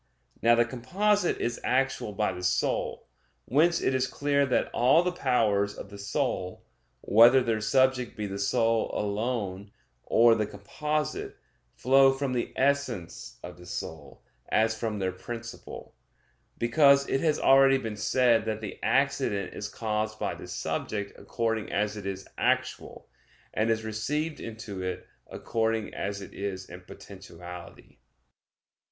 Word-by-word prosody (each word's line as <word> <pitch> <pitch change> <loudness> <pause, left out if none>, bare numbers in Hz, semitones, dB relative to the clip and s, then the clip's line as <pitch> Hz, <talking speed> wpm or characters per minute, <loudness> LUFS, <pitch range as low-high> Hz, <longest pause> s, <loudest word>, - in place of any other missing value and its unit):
Now 120 +1 +5
the 120 0 +3
composite 180 - 0
is 120 0 -2
actual 130 -4 0
by 105 -1 0
the 90 - -7
soul. 90 - -1 0.4
Whence 165 +7 +3
it - - +1
is 130 0 +1
clear 140 +1 +1
that 130 - 0
all 135 +8 +4
the 180 - 0
powers 110 - +1
of 100 - -9
the 100 - -10
soul, 100 -4 -2 0.4
whether 120 +5 +6
their 115 -2 0
subject 130 +3 +2
be 105 - -3
the 100 0 -5
soul 115 +3 +1
alone, 100 -2 -2 0.3
or 115 0 +5
the 110 -2 0
composite, 150 +10 -3 0.4
flow 135 +1 +5
from 135 -1 -2
the 120 - -2
essence 130 -10 -1
of 90 0 -9
the 90 - -13
soul, 80 -4 -7 0.3
as 110 +1 +2
from 110 -2 -3
their 95 -2 -1
principle; 115 +5 -8 0.6
because 140 +3 +4
it 135 - 0
has 155 -2 +2
already 135 0 +6
been 110 -5 -5
said 115 +1 +2
that 110 -1 -2
the 105 -2 -7
accident 100 -2 0
is 105 - -5
caused 110 -1 -2
by - - -2
the - - -10
subject 100 -1 -3
according 115 -2 -2
as 105 0 0
it 100 -2 -6
is 95 -1 -5
actual, - - -1 0.5
and 110 +1 +1
is 110 0 +1
received 150 +9 -2
into 110 -4 -7
it 95 0 -4 0.2
according 110 -1 -2
as 100 0 -4
it - - -12
is 95 -2 -5
in 90 +1 -10
potentiality. 90 -2 -12
115 Hz, 145 wpm, -28 LUFS, 100-130 Hz, 0.6 s, whether